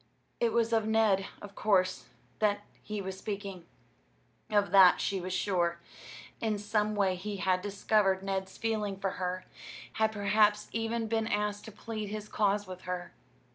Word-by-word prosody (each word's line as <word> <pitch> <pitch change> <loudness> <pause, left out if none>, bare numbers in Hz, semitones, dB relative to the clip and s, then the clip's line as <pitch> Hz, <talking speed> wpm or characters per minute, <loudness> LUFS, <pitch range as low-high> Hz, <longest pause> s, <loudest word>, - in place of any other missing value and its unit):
It 235 -1 +2
was 230 0 +1
of 220 -1 +2
Ned, 215 -3 +3 0.2
of 200 -1 -9
course, 185 -3 +1 0.3
that 205 -1 +2 0.2
he 210 -1 -4
was 190 0 -4
speaking. 200 -4 -5 0.8
Of 205 -3 +2
that 190 -2 +8
she 195 -2 -1
was 185 +1 -5
sure. 180 -2 +1 0.6
In 220 -2 0
some 210 +1 0
way 195 -2 +2
he 200 +3 -5
had 185 -1 +1
discovered 200 -1 +1
Ned's 190 -1 -3
feeling 215 -3 -1
for 195 -1 -1
her, 185 0 -2 0.5
had 220 0 +2
perhaps 210 0 +2
even 225 0 -1
been 225 0 0
asked 205 -1 -1
to 220 - -8
plead 215 0 -5
his 210 +1 -5
cause 205 -1 +1
with 185 -1 -9
her. 175 -1 -4
205 Hz, 160 wpm, -31 LUFS, 190-215 Hz, 0.8 s, that